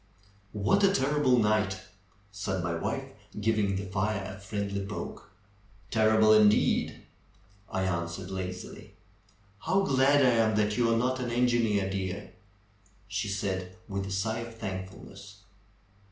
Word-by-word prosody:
'^What 105 Hz, -, +2 dB
a 195 Hz, -1 st, +5 dB
terrible 145 Hz, -5 st, +2 dB
night 105 Hz, -3 st, +2 dB, 0.5 s
said 95 Hz, -2 st, -3 dB
my 85 Hz, -1 st, -1 dB
wife, 85 Hz, -, -3 dB, 0.3 s
giving 105 Hz, -2 st, +1 dB
the 100 Hz, +1 st, -3 dB
fire 95 Hz, 0 st, -2 dB
a -, -, -13 dB
friendly 100 Hz, 0 st, -3 dB
poke. 105 Hz, +2 st, -7 dB, 0.6 s
^^Terrible 110 Hz, -1 st, +5 dB
indeed;" 105 Hz, 0 st, +2 dB, 0.7 s
I 95 Hz, 0 st, -1 dB
answered 85 Hz, 0 st, -3 dB
lazily. 90 Hz, -1 st, -6 dB, 0.7 s
^'How 195 Hz, +3 st, +3 dB
glad 135 Hz, -1 st, +4 dB
I -, -, +6 dB, 0.2 s
am 110 Hz, -, 0 dB
that 105 Hz, 0 st, +1 dB
you 120 Hz, -1 st, +2 dB
are 115 Hz, -, +3 dB
not 130 Hz, +2 st, 0 dB
an 125 Hz, -1 st, -2 dB
engineer, 120 Hz, -5 st, +2 dB
dear 95 Hz, 0 st, -4 dB, 0.4 s
!" 100 Hz, 0 st, -33 dB
she 105 Hz, +1 st, -1 dB
said 95 Hz, -2 st, -3 dB
with 100 Hz, 0 st, -3 dB
a -, -, -6 dB
sigh 110 Hz, +4 st, -1 dB
of 115 Hz, 0 st, -7 dB
thankfulness. 100 Hz, 0 st, -8 dB
100 Hz, 140 wpm, -29 LUFS, 95-115 Hz, 0.7 s, I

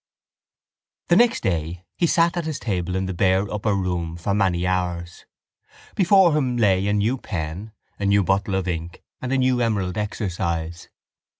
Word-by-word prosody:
The 175 Hz, -, +5 dB
next 235 Hz, +4 st, +4 dB
day 85 Hz, -2 st, -2 dB
he 170 Hz, -, +1 dB
sat 170 Hz, +1 st, +2 dB
at 175 Hz, -2 st, -2 dB
his 155 Hz, -2 st, -3 dB
table 90 Hz, -7 st, -2 dB
in 95 Hz, 0 st, -1 dB
the 95 Hz, -, -3 dB
bare 95 Hz, +2 st, +2 dB
upper 105 Hz, 0 st, 0 dB
room 90 Hz, -3 st, -2 dB
for 100 Hz, +4 st, -2 dB
many 95 Hz, -3 st, +1 dB
hours. 90 Hz, -2 st, -2 dB, 0.7 s
Before 190 Hz, -3 st, +4 dB
him 130 Hz, -5 st, 0 dB
lay 100 Hz, -4 st, +2 dB
a 105 Hz, -, +1 dB
new 110 Hz, +6 st, +1 dB
pen, 90 Hz, +2 st, -5 dB, 0.3 s
a 100 Hz, -, -1 dB
new 100 Hz, 0 st, +4 dB
bottle 95 Hz, +1 st, 0 dB
of 95 Hz, -1 st, -1 dB
ink 85 Hz, -1 st, -5 dB, 0.2 s
and 130 Hz, -, -4 dB
a 135 Hz, -, +2 dB
new 130 Hz, -1 st, +2 dB
emerald 105 Hz, -5 st, -1 dB
exercise. 85 Hz, -5 st, -3 dB
95 Hz, 170 wpm, -23 LUFS, 90-120 Hz, 0.7 s, The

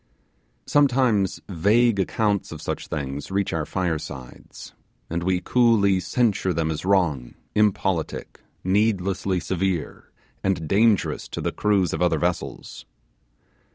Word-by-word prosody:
Sometimes 125 Hz, -8 st, +2 dB
vague 105 Hz, +5 st, +2 dB
accounts 100 Hz, +1 st, 0 dB
of 80 Hz, -, -7 dB
such -, -, -4 dB
thing's 70 Hz, -1 st, -4 dB
reach 100 Hz, 0 st, -1 dB
our 80 Hz, -2 st, -2 dB
firesides, 75 Hz, -8 st, -5 dB, 0.4 s
and 85 Hz, +1 st, -1 dB
we 90 Hz, +1 st, 0 dB
coolly 110 Hz, -6 st, +3 dB
censure 100 Hz, -3 st, 0 dB
them 80 Hz, 0 st, -1 dB
as 75 Hz, -, -4 dB
wrong, 85 Hz, -10 st, +1 dB, 0.2 s
impolitic, 95 Hz, -5 st, 0 dB, 0.2 s
needlessly 95 Hz, -1 st, +1 dB
severe, 90 Hz, -1 st, -3 dB, 0.3 s
and 90 Hz, -5 st, 0 dB
dangerous 105 Hz, +3 st, +2 dB
to -, -, -6 dB
the -, -, -1 dB
crews 100 Hz, -4 st, +1 dB
of -, -, -3 dB
other 90 Hz, -, +3 dB
vessels. 85 Hz, 0 st, -4 dB
95 Hz, 120 wpm, -24 LUFS, 85-105 Hz, 0.4 s, coolly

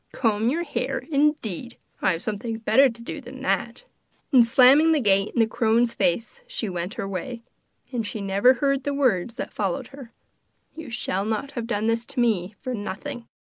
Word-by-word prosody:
'Comb 220 Hz, -1 st, +1 dB
your 335 Hz, +6 st, 0 dB
hair, 270 Hz, -4 st, -3 dB
indeed! 275 Hz, -, 0 dB, 0.2 s
I 190 Hz, -, +3 dB
have 165 Hz, -, -5 dB
something 220 Hz, +2 st, -3 dB
better 230 Hz, +5 st, +4 dB
to 235 Hz, 0 st, -11 dB
do -, -, -6 dB
than -, -, -10 dB
that!' -, -, -1 dB, 0.5 s
And 255 Hz, -4 st, +7 dB
slamming 270 Hz, +7 st, +6 dB
the 310 Hz, -, +2 dB
gate 195 Hz, -4 st, +3 dB
in -, -, +1 dB
the 225 Hz, -, +6 dB
crone's 230 Hz, +1 st, +1 dB
face 205 Hz, -, -1 dB
she -, -, -4 dB
went 180 Hz, +1 st, -4 dB
her 195 Hz, -, -4 dB
way. 230 Hz, +6 st, -5 dB, 0.5 s
And 240 Hz, -3 st, -2 dB
she 215 Hz, +1 st, -5 dB
never 200 Hz, +5 st, +4 dB
heard 275 Hz, +1 st, 0 dB
the 285 Hz, 0 st, -2 dB
words 235 Hz, -6 st, +1 dB
that -, -, -6 dB
followed 195 Hz, -4 st, -2 dB
her: 270 Hz, -4 st, -11 dB, 0.6 s
'You 315 Hz, -4 st, -8 dB
shall 195 Hz, -4 st, -2 dB
not 220 Hz, +6 st, -2 dB
have 235 Hz, -2 st, -5 dB
done 210 Hz, -2 st, -1 dB
this 230 Hz, +1 st, +1 dB
to 255 Hz, -, -5 dB
me 210 Hz, -5 st, +1 dB
for 255 Hz, -1 st, -4 dB
nothing! 235 Hz, +4 st, -6 dB
230 Hz, 190 wpm, -24 LUFS, 205-265 Hz, 0.6 s, And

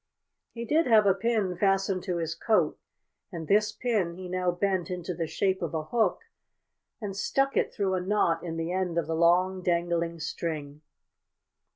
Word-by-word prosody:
He 235 Hz, 0 st, -6 dB
did 315 Hz, +7 st, +2 dB
have 220 Hz, -3 st, +6 dB
a 195 Hz, -, +5 dB
pin 205 Hz, -2 st, 0 dB
fastened 195 Hz, 0 st, +1 dB
to 180 Hz, -3 st, -1 dB
his 165 Hz, -1 st, -2 dB
coat, 215 Hz, +6 st, +1 dB, 0.5 s
and 165 Hz, -4 st, -6 dB
this 210 Hz, +1 st, +3 dB
pin 210 Hz, -9 st, -1 dB
he 185 Hz, 0 st, -7 dB
now 180 Hz, 0 st, 0 dB
bent 180 Hz, -1 st, 0 dB
into 180 Hz, -1 st, -4 dB
the 165 Hz, -1 st, -3 dB
shape 190 Hz, +4 st, 0 dB
of -, -, -3 dB
a 155 Hz, -, -1 dB
hook 215 Hz, +3 st, 0 dB, 0.8 s
and 205 Hz, -4 st, -5 dB
stuck 270 Hz, +7 st, 0 dB
it -, -, +1 dB
through 195 Hz, -2 st, -1 dB
a 185 Hz, -, 0 dB
knot 180 Hz, -3 st, +1 dB
in 165 Hz, -2 st, -4 dB
the 165 Hz, +1 st, -2 dB
end 180 Hz, -2 st, -1 dB
of 170 Hz, -, +1 dB
the 160 Hz, -, -3 dB
long, 180 Hz, +3 st, +3 dB
dangling 170 Hz, -1 st, 0 dB
string. 150 Hz, -2 st, -4 dB
185 Hz, 180 wpm, -28 LUFS, 170-200 Hz, 0.8 s, have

